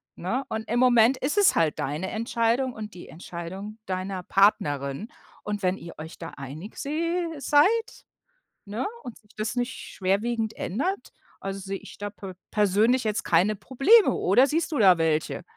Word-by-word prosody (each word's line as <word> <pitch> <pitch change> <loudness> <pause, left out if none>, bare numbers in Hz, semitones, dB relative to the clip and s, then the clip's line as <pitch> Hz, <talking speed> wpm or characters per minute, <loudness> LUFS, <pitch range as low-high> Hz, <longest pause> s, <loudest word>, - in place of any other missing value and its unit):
ne, 230 +10 -2
und 220 0 -4
im 235 - +1
Moment 245 0 +5
ist 295 +11 -2
es 405 - +5
halt 155 -3 +1
deine 155 +7 -2
Entscheidung 230 +3 0
und 215 -1 -8
die 175 - -11
Entscheidung 180 +5 -8
deiner 185 0 -3
Partnerin. 145 - +1 0.3
Und 210 -1 -3
wenn 185 +1 +1
ihr 170 -2 -10
euch 160 +2 -9
da 165 - -6
einig 145 - -8
se 335 +4 -1
seid, 375 +12 +2 0.6
ne? 215 +6 -3 0.2
Und 245 -3 -8
sich 210 - -29
das 215 +1 -2
nicht 245 +1 -1
schwerwiegend 220 +4 -2
ändert, 330 - -3 0.3
also, 195 0 -5
sehe 195 0 -4
ich - - -13
da 205 0 -4
pe 195 -2 -9 0.2
persönlich 215 +5 +3
jetzt 215 -1 -1
keine 180 +6 +3
Probleme, 275 - +4
oder 260 - +4
siehst 320 +3 -1
du 295 - 0
da 190 -4 +7
welche? 160 -1 0
215 Hz, 165 wpm, -26 LUFS, 185-255 Hz, 0.6 s, da